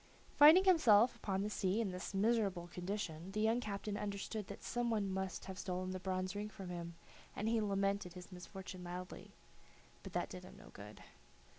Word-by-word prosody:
Finding 310 +6 +9
himself 250 - +6
upon 195 -1 -2
the 210 - -1
sea 195 +1 0
in 215 -5 0
this 180 0 -5
miserable 200 -4 +2
condition, 180 -2 -4
the 215 - -1
young 220 +2 +3
captain 205 -2 -4
understood 205 0 -4
that 200 - -9
some 240 -1 -1
one 210 -3 +1
must 190 0 -3
have 190 0 -7
stolen 185 0 -3
the 185 - -4
bronze 185 0 -2
ring 210 +1 -3
from 195 -3 -8
him, 170 -1 -5 0.4
and 210 - -2
he 225 0 +2
lamented 200 -2 0
his 180 +1 -10
misfortune 185 0 -8
loudly; 180 +1 -7 0.7
but - - -10
that - - -1
did - - -7
him - - -12
no - - -13
good. - - -11
195 Hz, 185 wpm, -37 LUFS, 185-215 Hz, 0.7 s, Finding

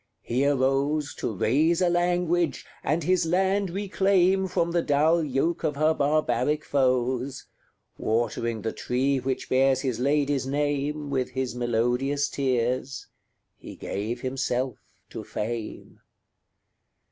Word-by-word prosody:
He 130 +4 +1
arose 140 +2 +1
To - - -2
raise 145 - +2
a 180 - +3
language, 175 -2 +1 0.2
and 155 +3 0
his 180 0 +2
land 190 +3 +1
reclaim 190 0 +2
From 170 -2 0
the 170 0 +2
dull 155 +3 +3
yoke 150 +5 -1
of 150 -3 0
her 155 +2 +3
barbaric 150 -1 +1
foes: 130 0 0 0.5
Watering 115 0 -1
the 110 - -1
tree 130 +2 0
which 130 0 -3
bears 130 0 +3
his 125 -4 -2
lady's 140 0 +1
name 145 +1 -1
With 130 -2 0
his 130 -1 -3
melodious 125 +4 0
tears, 130 0 -1 0.5
he - - -10
gave 110 +5 -4
himself 130 -2 -2 0.3
to - - -6
fame. 110 +1 -5
140 Hz, 125 wpm, -26 LUFS, 125-160 Hz, 0.5 s, a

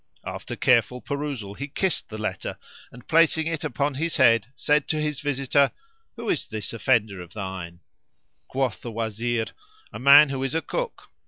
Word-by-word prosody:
After - - -5
careful 125 0 +3
perusal 140 -8 -4
he 140 +7 -5
kissed 185 +6 -1
the 110 - -6
letter, 110 - -4 0.3
and 125 -1 -14
placing 160 -1 +4
it 165 -2 -2
upon 145 0 -1
his 165 +5 -2
head 115 -2 +5
said 150 -1 +2
to 155 - 0
his 150 -1 -1
visitor, 140 -1 +2 0.5
"Who 235 -1 -7
is 160 - 0
this 110 -1 -5
offender 110 -5 +1
of 90 +1 -12
thine?" 95 -4 -6 0.7
Quoth 130 -4 -1
the 120 - -6
Wazir, 115 +1 -1 0.5
"A - - -6
man 140 +3 +8
who 135 -1 -3
is 135 +2 -2
a 165 - +1
cook." - - -4
135 Hz, 170 wpm, -25 LUFS, 110-150 Hz, 0.7 s, man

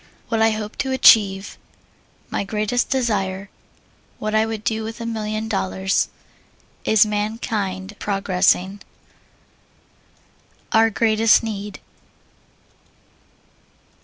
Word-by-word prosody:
What 225 -2 0
I 225 - +5
Hope 215 0 -5
to 275 -2 -1
Achieve. 200 -6 +4 0.7
My - - -1
Greatest 215 +4 -1
Desire. 200 -7 -1 0.7
What 215 0 -3
I 220 +1 +3
Would 220 -1 -5
Do 220 0 -1
with 225 +1 -7
a 230 - -5
Million 215 -1 -3
Dollars. 190 -2 0 0.7
Is 220 -1 +5
Mankind 210 -2 -3
Progressing? 195 0 +1 1.9
Our 225 0 +5
Greatest 220 +1 +3
Need. 210 -2 -5
215 Hz, 95 wpm, -21 LUFS, 195-225 Hz, 1.9 s, I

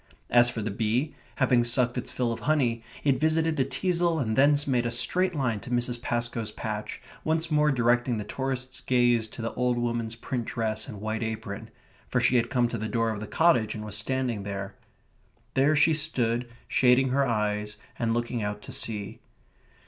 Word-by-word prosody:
As 120 0 +7
for 115 -3 -4
the 105 - -2
bee, 115 +8 0 0.2
having 125 -2 +3
sucked 120 0 +1
its 125 - -3
fill 120 -2 -1
of - - -7
honey, 130 -7 +1 0.2
it 135 -3 +2
visited 160 +1 +2
the 135 - +2
teasle 175 +1 0
and 110 -5 -1
thence 145 +2 +4
made 125 -3 +1
a - - 0
straight 180 +8 +2
line 125 -7 0
to 100 - -10
Mrs. 120 0 -1
Pascoe's 120 -2 -2
patch, - - -5 0.2
once 160 +1 0
more 150 0 +4
directing 120 -1 +2
the 105 - -3
tourists' 130 +2 -3
gaze 120 -3 +2
to 115 - -8
the 115 - -3
old 125 -1 0
woman's 120 -1 -2
print 120 +1 -4
dress 110 -2 -3
and 110 -6 -8
white 110 +1 -2
apron, 110 -2 -5 0.4
for - - +1
she 125 - +3
had 120 0 +1
come 125 -3 +2
to 115 - -4
the 110 +1 -3
door 115 -1 +1
of 105 - -4
the 110 - -6
cottage 120 -10 +3
and 105 0 -6
was 105 -1 -5
standing 125 -1 -1
there. 100 0 -5 0.8
There 140 +3 +3
she 150 +2 +4
stood, 125 -6 0 0.2
shading 130 +1 +4
her 135 +1 +2
eyes 105 -2 -1 0.2
and 115 -1 0
looking 120 0 -1
out 105 0 -4
to - - -8
sea. 105 -3 -3
120 Hz, 195 wpm, -27 LUFS, 110-135 Hz, 0.8 s, As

